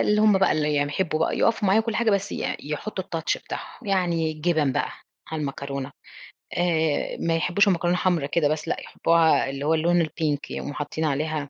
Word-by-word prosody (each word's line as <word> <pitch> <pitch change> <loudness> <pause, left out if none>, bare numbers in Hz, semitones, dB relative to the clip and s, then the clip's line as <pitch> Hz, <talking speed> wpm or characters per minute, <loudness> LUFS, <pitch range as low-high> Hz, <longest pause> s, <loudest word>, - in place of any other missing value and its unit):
اللي 210 0 +3
هُم 210 -2 +5
بقى 190 - +3
اللي 150 -1 0
يحبوا 150 +3 0
بقى 160 - +1
يقفوا 225 -3 +2
معايا 210 +3 +5
وكُلّ 225 -1 -2
حاجة، 235 -1 +2
بس 200 0 0
ي - - -2
يحطوا 180 +6 -4
الtouch 165 -4 -2
بتاعهم، 230 - -8
يعني 175 -5 +1
الجبن 155 -3 +1
بقى - - -1 0.4
على 160 - -2
المكرونة، 140 -1 -4 0.7
آآ، 160 -4 +1
ما 165 -1 +1
يحبوش 180 +5 +2
المكرونة 175 -2 +2
حمرا 175 -6 +1
كده 150 +1 +1
بس، 155 0 -2
لأ، - - -1
يحبوها 165 -4 +2
اللي 140 +1 -4
هو 160 - +3
اللون 170 +1 +3
الPink 155 -2 -1
يقوموا 145 - -5
حاطين 150 +2 -3
عليها 150 0 -1
160 Hz, 190 wpm, -24 LUFS, 150-185 Hz, 0.7 s, هُم